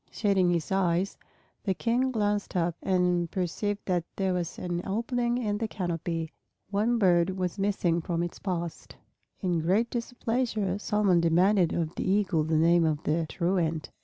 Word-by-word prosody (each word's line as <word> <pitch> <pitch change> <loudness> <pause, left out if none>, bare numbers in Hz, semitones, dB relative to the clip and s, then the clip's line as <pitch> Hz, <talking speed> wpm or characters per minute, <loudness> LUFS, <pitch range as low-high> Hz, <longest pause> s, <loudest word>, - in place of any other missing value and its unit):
Shading 195 -4 +2
his 170 -1 -1
eyes, 190 0 +1 0.5
the 190 -3 0
King 245 +6 +1
glanced 205 -4 -1
up 170 -1 +1
and 180 -2 +1
perceived 200 +4 -2
that 180 -3 0
there 190 -1 0
was 175 -1 -3
an 175 -1 -3
opening 235 +4 -1
in 210 -4 -1
the 225 - -1
canopy. 165 -4 -3 0.4
One 220 +4 +2
bird 175 -4 +4
was 185 +1 -2
missing 190 -4 +1
from 170 +1 -1
its 175 - -5
post. 175 -4 -4 0.5
In 180 -4 +1
great 195 +9 +1
displeasure 230 -4 -1
Solomon 205 -4 +2
demanded 175 +2 +3
of 165 -1 -2
the - - -2
Eagle 190 -5 +2
the 160 0 +1
name 170 +2 +4
of 155 -1 0
the 160 +1 0
truant. 170 -3 -1
185 Hz, 160 wpm, -28 LUFS, 170-205 Hz, 0.5 s, bird